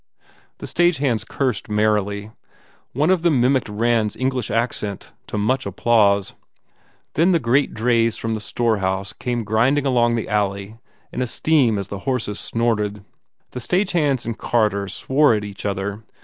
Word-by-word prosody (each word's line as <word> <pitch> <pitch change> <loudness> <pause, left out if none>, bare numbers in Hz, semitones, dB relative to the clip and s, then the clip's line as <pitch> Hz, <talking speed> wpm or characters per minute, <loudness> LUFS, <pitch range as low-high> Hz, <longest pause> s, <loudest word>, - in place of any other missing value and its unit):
The - - -8
stage 175 -1 +2
hands 130 -6 0
cursed 130 -8 -2
merrily. 105 -1 0 0.6
One 150 +7 +2
of 185 -3 +2
them 165 -6 +3
mimicked 125 -1 +2
Rand 115 +1 +1
s - - -11
English 130 -3 -1
accent 110 -3 -2 0.2
to - - -4
much 130 +6 0
applause. 100 -4 +2 0.8
Then 175 +4 +3
the 170 - +3
great 130 +2 +1
drays 115 0 +2
from 115 0 -3
the 110 - -2
store 115 +1 0
house 95 0 -2
came 120 -2 -3
grinding 120 +7 +2
along 120 -3 +2
the 115 - -3
alley 100 +1 -2 0.3
in - - -2
a 125 - 0
steam 130 -5 +2
as 100 -1 -4
the 100 - -5
horses 110 -5 -2
snorted. 105 -3 -1 0.5
The 125 - -5
stage 180 - 0
hands 145 -7 +1
and 115 -1 -3
carters 100 -5 0
swore 140 -3 +3
at 105 - -2
each 100 0 -6
other. 100 +2 -3
115 Hz, 165 wpm, -21 LUFS, 105-130 Hz, 0.8 s, them